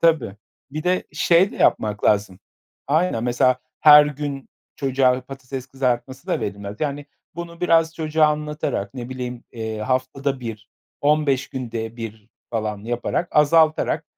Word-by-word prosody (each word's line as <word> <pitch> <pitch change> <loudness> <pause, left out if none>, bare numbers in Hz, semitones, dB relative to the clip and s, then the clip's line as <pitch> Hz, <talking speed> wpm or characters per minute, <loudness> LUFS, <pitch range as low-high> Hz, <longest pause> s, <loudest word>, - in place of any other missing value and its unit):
Tabii. 145 -12 +2 0.3
Bir 155 +2 -4
de 185 +1 +1
şey 175 +4 +4
de - - -9
yapmak 105 -1 +1
lazım. 100 -3 +2 0.5
Aynen, 150 -5 +1
mesela, 125 +1 +2 0.2
her 150 -1 +9
gün 145 -2 -5 0.3
çocuğa 130 -2 +2
patates 130 0 -8
kızartması 130 0 -2
da - - 0
verilmez. 100 0 -5
Yani, 145 -1 -2 0.3
bunu 170 0 -8
biraz 165 -2 +3
çocuğa 155 -1 +2
anlatarak, 150 -9 -2
ne 125 -1 -6
bileyim, 125 -2 -6
eee, 110 -2 -4
haftada 130 +3 -1
1 110 -2 -7 0.3
15 145 -2 +2
günde 115 -3 -5
1 110 -2 -8 0.2
falan 110 -3 -2
yaparak 120 +8 -2
azaltarak, 155 +1 +3
130 Hz, 135 wpm, -22 LUFS, 115-150 Hz, 0.5 s, her